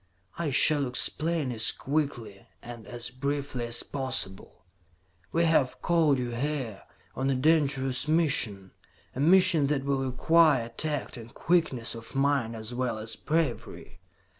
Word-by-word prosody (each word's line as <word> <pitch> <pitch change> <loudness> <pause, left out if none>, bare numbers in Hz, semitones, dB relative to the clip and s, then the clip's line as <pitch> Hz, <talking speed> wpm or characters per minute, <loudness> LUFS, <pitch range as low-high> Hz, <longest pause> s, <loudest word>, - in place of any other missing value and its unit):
"I 170 -3 -2
shall 145 +1 +4
explain 150 +3 +1
as 110 -2 +2
quickly 135 -9 -4 0.2
and 120 -2 -10
as 120 -1 -5
briefly 140 -2 -3
as 120 0 +2
possible. 100 -9 -4 0.7
"We 170 +1 +2
have 150 -6 +1
called 160 -5 +3
you 125 -1 -3
here 125 -4 -3 0.3
on 135 +1 -1
a 135 - +1
dangerous 135 -2 +1
mission. 135 - 0 0.4
A - - -5
mission 170 -1 +4
that 140 -2 -1
will 135 -1 0
require 145 -2 +3
tact 145 +2 -4
and 115 0 -11
quickness 160 -9 0
of 115 +3 -10
mind 135 -4 0
as 110 +2 -6
well 125 -2 -2
as 110 +1 -6
bravery. 150 - -3
135 Hz, 140 wpm, -27 LUFS, 120-150 Hz, 0.7 s, shall